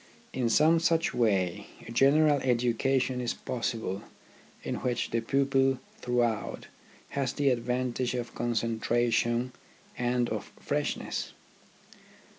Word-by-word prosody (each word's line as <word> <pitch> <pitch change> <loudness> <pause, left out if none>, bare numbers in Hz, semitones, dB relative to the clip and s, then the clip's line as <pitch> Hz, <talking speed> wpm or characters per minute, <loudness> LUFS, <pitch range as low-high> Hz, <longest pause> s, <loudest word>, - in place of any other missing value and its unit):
In 125 -2 0
some 160 +7 +5
such 165 0 +2
way 95 -7 +1 0.2
a - - -7
general 145 +4 +4
educa 125 +1 +2
tion 125 0 -1
is 120 - -2
possible 115 -5 -3 0.6
in - - -3
which 125 -2 -2
the 115 - +1
pupil 135 +1 +2 0.2
throughout 120 -3 -1 0.4
has 135 -3 -1
the 140 -1 +2
advantage 125 +1 -1
of 120 -1 -4
concentration 120 +1 0 0.4
and 120 0 +1
of - - -4
freshness. - - -2
125 Hz, 110 wpm, -29 LUFS, 115-135 Hz, 0.6 s, some